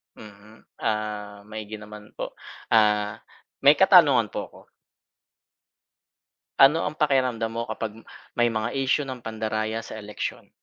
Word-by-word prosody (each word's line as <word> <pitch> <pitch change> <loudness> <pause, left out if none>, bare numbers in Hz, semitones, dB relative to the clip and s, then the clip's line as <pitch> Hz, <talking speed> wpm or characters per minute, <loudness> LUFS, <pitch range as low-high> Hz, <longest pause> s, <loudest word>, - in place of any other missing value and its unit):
Mm, 105 +1 -15 0.2
ah, 105 -1 -3
maigi 110 0 -6
naman 105 0 -12
po, - - -5 0.4
ah, 105 -1 +3 0.4
may 140 +2 +6
katanungan 145 - +6
po - - -3
ako. - - -17 2.0
Ano 150 +5 +6
ang 150 +1 -3
pakiramdam 125 -6 +1
mo 115 0 -4
kapag 110 0 -5 0.3
may 120 0 +2
mga 110 0 -2
isyu 135 +1 +1
ng 130 -2 -7
pandaraya 110 0 -3
sa - - -9
eleksyon? 105 0 -6
110 Hz, 125 wpm, -25 LUFS, 105-130 Hz, 2.0 s, may